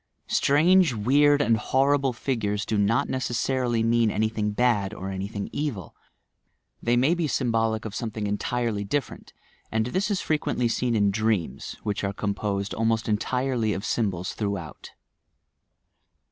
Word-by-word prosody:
Strange, 160 0 +4
weird 145 +6 +4
and 115 -4 +3
horrible 135 +3 +2
figures 105 -5 -2
do 110 - -1
not 105 +3 +2
necessarily 125 -1 0
mean 115 0 +3
any 110 +1 0
thing 105 -1 -2
bad 105 -2 +1
or 95 -1 -5
anything 100 +2 -4
evil; 140 - -4 0.9
they 120 +1 +2
may 135 +7 +3
be 170 -3 0
symbolic 115 -5 0
of 110 - -5
something 110 0 -4
entirely 105 +1 -1
different, 135 +8 -4 0.4
and 110 0 +1
this 185 - -1
is 200 -3 0
frequently 150 -5 0
seen 120 +1 0
in 100 -2 +3
dreams 110 -4 -1
which 105 -1 -2
are 100 0 -1
composed 100 0 -2
almost 115 0 0
entirely 120 +1 0
of 100 +2 -4
sym 110 -4 +1
bols 90 +1 -5
throughout. 100 -7 -5
115 Hz, 145 wpm, -25 LUFS, 105-130 Hz, 0.9 s, Strange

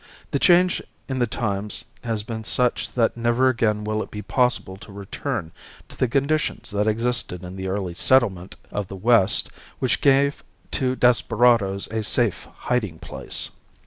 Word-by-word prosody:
The 140 - +1
change 180 +2 +4 0.3
in 130 -1 -2
the 120 - +2
times 105 -2 -2 0.2
has 115 -3 -1
been 110 0 -5
such 125 +2 0
that 115 -2 +2
never 120 +2 +2
again 110 -4 +1
will 110 0 -1
it - - -6
be 105 0 -7
possible 120 -2 +1
to 100 - -13
return 100 - -4 0.4
to - - -13
the 130 - +1
conditions 140 +1 0
that 105 +1 0
existed 110 -5 -1
in 90 +1 -8
the 95 0 -4
early 95 -2 -2
settlement 95 -3 +2 0.2
of 105 -2 -3
the 95 - -8
west 110 0 +3 0.3
which 115 -5 0
gave 140 0 +3 0.3
to 130 -2 0
desperadoes 115 -5 +3
a 110 0 -1
safe 110 -1 0
hiding 105 -10 -2
place. - - -5
115 Hz, 160 wpm, -23 LUFS, 100-125 Hz, 0.4 s, change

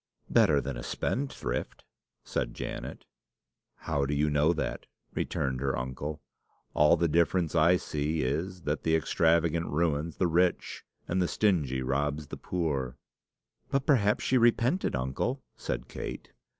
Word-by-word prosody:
"Better 75 -2 +5
than 70 0 -4
a - - -5
spendthrift," 135 - -3 0.4
said - - -3
Janet. - - -6 0.8
"How 70 - 0
do 75 - -1
you 75 +1 +2
know 75 +3 +4
that?" 85 - -3 0.3
returned 65 -2 -2
her 70 -1 0
uncle. 65 +4 -5 0.5
"All 75 +3 +5
the 85 +1 +2
difference 85 +1 +2
I 85 +2 +5
see 75 -1 -2
is, 85 +7 -2
that 75 +1 -1
the 80 - +2
extravagant 85 +1 +2
ruins 80 0 0
the 95 - +2
rich, 90 +1 +1 0.2
and 90 +2 +1
the 90 - +2
stingy 75 -13 +1
robs 70 +3 -1
the - - -6
poor." 70 -8 -2 0.7
"But 135 0 0
perhaps 105 -8 +3
she 130 - +3
repented, 120 - +2
uncle," 65 - -2
said - - -4
Kate. - - -7
80 Hz, 140 wpm, -29 LUFS, 70-90 Hz, 0.8 s, Better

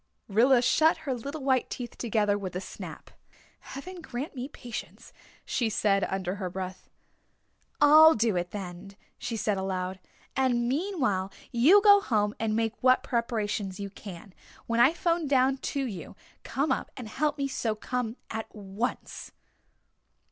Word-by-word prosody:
Rilla 240 +4 +4
shut 315 +7 +4
her 270 - 0
little 280 +5 -6
white 260 -2 +2
teeth 245 -1 -6
together 210 -3 +1
with 190 -3 -5
a - - -1
snap. - - -9 0.5
"Heaven 355 +6 -9
grant 270 -1 -5
me 255 0 -4
patience," 240 -5 -9 0.3
she 235 -3 0
said 200 -2 +2
under 190 0 -3
her 185 -2 -3
breath. 185 0 -6 0.9
"I'll 310 +2 +8
do 225 -3 +1
it 175 0 -1
then," 195 -1 -8 0.2
she 235 -2 -3
said 210 -2 0
aloud, 190 -1 -3 0.4
"and 245 -3 +2
meanwhile, 260 - 0 0.2
you 320 +13 +6
go 405 -1 +8
home 210 - +1
and 220 -1 0
make 225 0 0
what 255 0 +4
preparations 215 -5 -2
you 200 -1 -5
can. 195 -1 -10 0.3
When 230 0 0
I 240 +5 +7
'phone 335 -1 0
down 265 -1 +3
to 275 0 -2
you 210 -7 -7
to - - -19
come 280 +1 0
up - - -1
and 245 -4 -6
help 295 +6 -1
me 280 -1 -1
sew 225 -5 -2
come 245 +1 -3
at 220 0 -4
once." 205 +4 -4
235 Hz, 155 wpm, -28 LUFS, 200-270 Hz, 0.9 s, I'll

